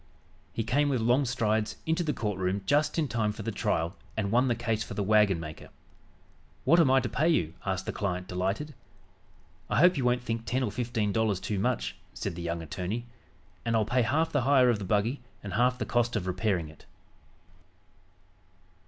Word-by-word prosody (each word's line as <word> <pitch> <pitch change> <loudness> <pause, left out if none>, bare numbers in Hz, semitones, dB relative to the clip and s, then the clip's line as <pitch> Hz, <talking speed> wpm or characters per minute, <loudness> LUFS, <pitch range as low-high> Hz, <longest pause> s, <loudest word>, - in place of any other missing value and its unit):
He 115 - -2
came, 140 +6 +2
with 130 -3 +1
long 120 +5 +3
strides, 110 -3 0
into 160 +2 +1
the 155 - 0
court 105 -8 -3
room 95 +1 -1
just 145 - +2
in 160 -3 +1
time 110 -4 0
for 105 - -7
the 115 - -2
trial 90 -5 -1 0.2
and 100 -2 -1
won 125 +3 +4
the 120 - +2
case 115 -2 -1
for - - -8
the 100 - 0
wagonmaker. 95 -7 +1 0.9
"What 165 +7 +5
am 160 -6 +5
I 135 0 +5
to 120 - -2
pay 155 +7 +1
you?" 85 - +1
asked 95 0 -1
the - - -2
client 90 -3 -3
delighted. 95 +12 -2 1.0
"I - - +1
hope 180 +4 +6
you 135 - 0
won't 125 0 +2
think 115 -1 -3
ten 130 +3 0
or 110 - -1
fifteen 115 -4 -1
dollars 110 -3 +1
too 95 +2 -2
much," 60 -9 -1 0.2
said - - -3
the 85 - -7
young 85 0 -3
attorney, 95 +9 -4 0.6
"and 115 -1 0
I'll 110 -1 +3
pay 125 +3 +2
half 150 +8 +1
the 145 - +2
hire 130 -1 +5
of 110 - -1
the 100 - -5
buggy 110 +7 0 0.2
and 100 -2 -6
half 125 +4 +2
the - - -2
cost 120 0 +1
of 100 -5 -1
repairing 90 -2 0
it." 75 0 -16
110 Hz, 200 wpm, -29 LUFS, 95-125 Hz, 1.0 s, hope